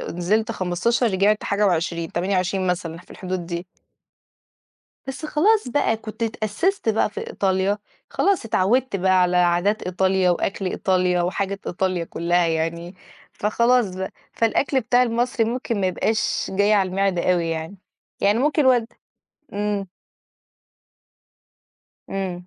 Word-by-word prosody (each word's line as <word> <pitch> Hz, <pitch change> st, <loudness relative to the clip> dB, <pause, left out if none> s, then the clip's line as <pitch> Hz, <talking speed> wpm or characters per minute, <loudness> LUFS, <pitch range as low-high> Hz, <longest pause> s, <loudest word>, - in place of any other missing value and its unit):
نزِلت 200 Hz, +6 st, -1 dB
15 190 Hz, +7 st, 0 dB
رجِعت 205 Hz, +3 st, +2 dB
حاجة 205 Hz, +1 st, +1 dB
و20، 170 Hz, -2 st, -1 dB
28 185 Hz, +1 st, 0 dB
مثلًا، 170 Hz, -2 st, -2 dB
في 180 Hz, -, -18 dB
الحدود 185 Hz, -2 st, -5 dB
دي. 170 Hz, +1 st, -5 dB, 1.4 s
بس 270 Hz, +4 st, -5 dB
خلاص 395 Hz, -, +2 dB
بقى 240 Hz, -4 st, +1 dB
كنت 220 Hz, +1 st, -8 dB
اتأسِّست 225 Hz, -, -1 dB
بقى 215 Hz, -1 st, +2 dB
في -, -, -6 dB
إيطاليا 195 Hz, +1 st, 0 dB, 0.3 s
خلاص، 395 Hz, -9 st, +1 dB
اتعودت 225 Hz, +3 st, +1 dB
بقى 185 Hz, 0 st, +3 dB
على 180 Hz, 0 st, +2 dB
عادات 180 Hz, +4 st, +2 dB
إيطاليا 185 Hz, 0 st, +1 dB
وأكْل 195 Hz, +2 st, -1 dB
إيطاليا 180 Hz, -1 st, +1 dB
وحاجة 195 Hz, +2 st, -2 dB
إيطاليا 185 Hz, -1 st, -1 dB
كلّها 175 Hz, +1 st, +1 dB
يعني، 165 Hz, +2 st, -2 dB, 0.4 s
فخلاص 235 Hz, -1 st, +1 dB
بقى، 190 Hz, 0 st, -4 dB, 0.2 s
فالأكْل 255 Hz, +4 st, +1 dB
بتاع 245 Hz, +1 st, +3 dB
المصري 240 Hz, 0 st, +1 dB
ممكن 235 Hz, -1 st, -2 dB
ما 190 Hz, -, +1 dB
يبقاش 215 Hz, +4 st, 0 dB
جاي 200 Hz, +2 st, +3 dB
على 195 Hz, -3 st, +3 dB
المِعدة 185 Hz, -1 st, +1 dB
أوي، 170 Hz, -2 st, 0 dB
يعني، 165 Hz, +4 st, -4 dB, 0.4 s
يعني 205 Hz, +3 st, +3 dB
ممكن 295 Hz, +1 st, +2 dB
والد 245 Hz, -3 st, +4 dB, 0.7 s
إمم. 205 Hz, -2 st, -2 dB, 2.2 s
إمم. 185 Hz, -2 st, -4 dB
195 Hz, 130 wpm, -22 LUFS, 180-225 Hz, 2.2 s, والد